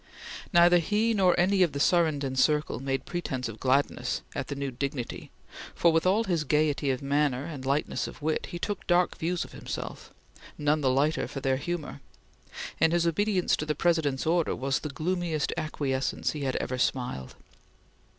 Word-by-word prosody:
Neither 175 Hz, -1 st, +6 dB
he 210 Hz, +7 st, +1 dB
nor 185 Hz, -4 st, +3 dB
any 190 Hz, +2 st, +3 dB
of 175 Hz, -4 st, +3 dB
the 140 Hz, -, -3 dB
Surrenden 145 Hz, -5 st, +2 dB
circle 150 Hz, -2 st, +2 dB
made 135 Hz, 0 st, -2 dB
pretence 130 Hz, -8 st, -3 dB
of 115 Hz, -1 st, -8 dB
gladness 135 Hz, +2 st, 0 dB
at -, -, -4 dB
the 140 Hz, -, -4 dB
new 140 Hz, -1 st, -3 dB
dignity 130 Hz, -1 st, -4 dB, 0.5 s
for, 170 Hz, -, +4 dB
with 165 Hz, +2 st, +2 dB
all 205 Hz, +5 st, +3 dB
his 175 Hz, -7 st, 0 dB
gaiety 150 Hz, -1 st, +1 dB
of 130 Hz, 0 st, -1 dB
manner 140 Hz, -1 st, +1 dB
and 145 Hz, -5 st, -6 dB
lightness 140 Hz, +2 st, 0 dB
of -, -, -10 dB
wit, 155 Hz, +1 st, -1 dB
he 175 Hz, -, -6 dB
took 205 Hz, +4 st, -4 dB
dark 175 Hz, 0 st, +3 dB
views 175 Hz, +2 st, -1 dB
of -, -, -14 dB
himself, -, -, -7 dB, 0.5 s
none 150 Hz, +1 st, +1 dB
the 135 Hz, -, +2 dB
lighter 140 Hz, +5 st, +1 dB
for 135 Hz, -, -6 dB
their 130 Hz, 0 st, +1 dB
humor, 155 Hz, -1 st, -4 dB, 0.8 s
and 160 Hz, +1 st, +4 dB
his 170 Hz, -1 st, +2 dB
obedience 185 Hz, +2 st, +2 dB
to 150 Hz, -, -3 dB
the 150 Hz, -, 0 dB
President's 155 Hz, -5 st, +1 dB
order 165 Hz, 0 st, +1 dB
was 135 Hz, +1 st, -1 dB
the 150 Hz, -, -5 dB
gloomiest 165 Hz, +1 st, -1 dB
acquiescence 140 Hz, -4 st, -1 dB
he 150 Hz, -2 st, -4 dB
had 130 Hz, -, -1 dB
ever 125 Hz, 0 st, -2 dB
smiled. 125 Hz, -, -2 dB
150 Hz, 180 wpm, -28 LUFS, 135-175 Hz, 0.8 s, Neither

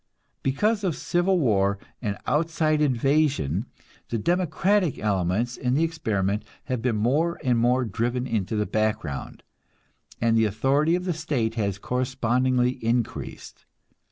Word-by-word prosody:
Because 205 Hz, +11 st, +1 dB
of 175 Hz, -6 st, 0 dB
civil 175 Hz, +1 st, +1 dB
war 100 Hz, -7 st, +2 dB, 0.2 s
and 105 Hz, -4 st, -2 dB
outside 155 Hz, 0 st, +1 dB
invasion, 135 Hz, -, +1 dB, 0.4 s
the 115 Hz, -, -1 dB
democratic 180 Hz, -, +1 dB
elements 105 Hz, +4 st, 0 dB
in 125 Hz, -1 st, 0 dB
the 155 Hz, -, +3 dB
experiment 105 Hz, -, -1 dB, 0.2 s
have 130 Hz, -4 st, -3 dB
been 120 Hz, -1 st, 0 dB
more 145 Hz, +11 st, +1 dB
and 125 Hz, -2 st, +2 dB
more 125 Hz, +2 st, +2 dB
driven 120 Hz, +4 st, -1 dB
into 110 Hz, -3 st, -1 dB
the 105 Hz, 0 st, +1 dB
background, 110 Hz, -11 st, -2 dB, 0.8 s
and 115 Hz, -1 st, +2 dB
the 110 Hz, 0 st, +4 dB
authority 135 Hz, -, +2 dB
of 180 Hz, 0 st, -3 dB
the 180 Hz, -, 0 dB
state 145 Hz, -8 st, -1 dB
has 100 Hz, -4 st, -1 dB
correspondingly 125 Hz, +1 st, 0 dB
increased. 115 Hz, 0 st, -3 dB
125 Hz, 130 wpm, -25 LUFS, 110-155 Hz, 0.8 s, the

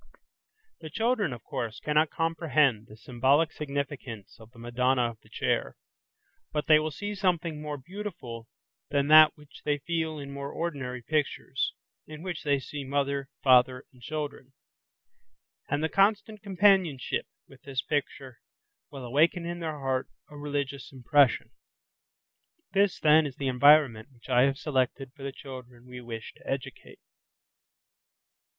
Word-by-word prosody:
The 155 Hz, -, -8 dB
children, 220 Hz, -, 0 dB
of 120 Hz, -2 st, -8 dB
course, 115 Hz, -2 st, -4 dB
cannot 150 Hz, +1 st, +2 dB
comprehend 155 Hz, -9 st, +1 dB
the 105 Hz, -, -14 dB
symbolic 130 Hz, +7 st, +2 dB
significance 140 Hz, -7 st, -5 dB
of 110 Hz, 0 st, -14 dB
the 120 Hz, -, -21 dB
"Madonna 120 Hz, +1 st, +1 dB
of 110 Hz, -, -17 dB
the -, -, -22 dB
Chair", -, -, -1 dB, 0.7 s
but 150 Hz, -1 st, -2 dB
they 155 Hz, -1 st, +6 dB
will 155 Hz, 0 st, -1 dB
see 205 Hz, +7 st, -5 dB
something 170 Hz, -5 st, -1 dB
more 150 Hz, -1 st, -4 dB
beautiful 140 Hz, -, -7 dB, 0.4 s
than 140 Hz, 0 st, +1 dB
that 155 Hz, 0 st, +8 dB
which 150 Hz, -1 st, -16 dB
they 145 Hz, -1 st, +1 dB
feel 160 Hz, +1 st, -2 dB
in 140 Hz, -1 st, -7 dB
more 140 Hz, 0 st, -5 dB
ordinary 135 Hz, -7 st, -4 dB
pictures, 145 Hz, -2 st, -1 dB, 0.3 s
in 155 Hz, +1 st, -9 dB
which 180 Hz, -3 st, -4 dB
they 145 Hz, -1 st, +2 dB
see 140 Hz, +2 st, -6 dB
mother, 140 Hz, 0 st, -1 dB
father, 130 Hz, 0 st, +4 dB
and 125 Hz, -, -20 dB
children. 145 Hz, -1 st, -5 dB, 1.2 s
And 145 Hz, +2 st, 0 dB
the -, -, +3 dB
constant 210 Hz, +3 st, +1 dB
companionship 190 Hz, -, +2 dB, 0.2 s
with 135 Hz, -, -17 dB
this 135 Hz, -2 st, -3 dB
picture 135 Hz, -4 st, -3 dB, 0.5 s
will 135 Hz, -4 st, -8 dB
awaken 160 Hz, +7 st, +2 dB
in 175 Hz, 0 st, -4 dB
their 160 Hz, -3 st, -4 dB
heart 130 Hz, -2 st, -2 dB, 0.2 s
a -, -, -11 dB
religious 140 Hz, -2 st, -4 dB
impression. 135 Hz, +1 st, +3 dB, 1.2 s
This, 200 Hz, -1 st, +2 dB
then, 155 Hz, 0 st, +5 dB
is 135 Hz, -, -9 dB
the 135 Hz, -, -3 dB
environment 130 Hz, -3 st, +5 dB
which 125 Hz, 0 st, -18 dB
I 125 Hz, 0 st, +5 dB
have 135 Hz, 0 st, -1 dB
selected 135 Hz, -2 st, -1 dB
for 140 Hz, -, -16 dB
the 135 Hz, 0 st, -4 dB
children 125 Hz, -3 st, -11 dB
we 125 Hz, 0 st, -9 dB
wish 115 Hz, -2 st, -7 dB
to -, -, -18 dB
educate. 135 Hz, -2 st, -6 dB
140 Hz, 145 wpm, -28 LUFS, 130-155 Hz, 1.2 s, that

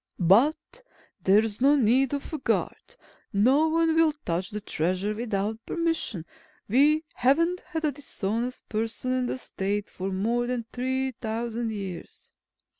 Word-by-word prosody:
"But 245 Hz, -, +3 dB, 0.4 s
there's 210 Hz, +3 st, +3 dB
no 280 Hz, +3 st, +6 dB
need 260 Hz, +1 st, +3 dB
of 280 Hz, -, -7 dB
a 310 Hz, -, -2 dB
guard. -, -, -2 dB, 0.4 s
No 255 Hz, +9 st, +4 dB
one 325 Hz, 0 st, +2 dB
will 325 Hz, -1 st, +4 dB
touch 175 Hz, +2 st, -1 dB
the 210 Hz, -, -4 dB
Treasure 185 Hz, +2 st, -1 dB
without 220 Hz, 0 st, -2 dB
permission. 325 Hz, -, -1 dB, 0.4 s
We 295 Hz, +8 st, +4 dB
haven't 335 Hz, +8 st, +2 dB
had 320 Hz, -3 st, -4 dB
a 300 Hz, -, +2 dB
dishonest 245 Hz, -3 st, -4 dB
person 225 Hz, +3 st, -2 dB
in 255 Hz, 0 st, +1 dB
the -, -, -2 dB
State 205 Hz, -4 st, -3 dB
for 190 Hz, +1 st, -4 dB
more 230 Hz, +6 st, 0 dB
than 245 Hz, -2 st, -2 dB
three 260 Hz, +1 st, -1 dB
thousand 230 Hz, 0 st, -3 dB
years." 195 Hz, -5 st, -7 dB
240 Hz, 140 wpm, -27 LUFS, 205-280 Hz, 0.4 s, no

